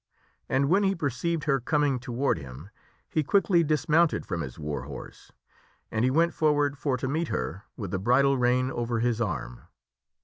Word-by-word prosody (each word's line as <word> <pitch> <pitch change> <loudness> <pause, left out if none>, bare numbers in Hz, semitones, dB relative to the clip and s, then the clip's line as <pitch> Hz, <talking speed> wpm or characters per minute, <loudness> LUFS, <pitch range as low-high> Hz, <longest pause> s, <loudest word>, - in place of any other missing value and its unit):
And 135 +1 +2
when 190 +7 +4
he 195 -1 +2
perceived 160 +2 -2
her 140 -2 +2
coming 145 0 +1
to 120 +1 -8
ward 135 +4 0
him 70 +8 -10 0.4
he 155 - 0
quickly 175 +2 +3
dismounted 155 +2 +2
from 85 -3 -3
his 65 -5 -7
war 75 -4 -4
horse 70 -2 -10 0.6
and 110 - 0
he 130 - +4
went 165 +5 +2
for 155 -1 +2
ward 145 -1 +1
for 135 -2 -1
to 130 - -3
meet 160 +5 -1
her 80 - -4
with 100 -5 -5
the 95 - -1
bridle 130 +6 +3
rein 125 +1 +2
over 120 -2 -2
his 120 0 0
arm. - - -3
130 Hz, 190 wpm, -27 LUFS, 105-150 Hz, 0.6 s, when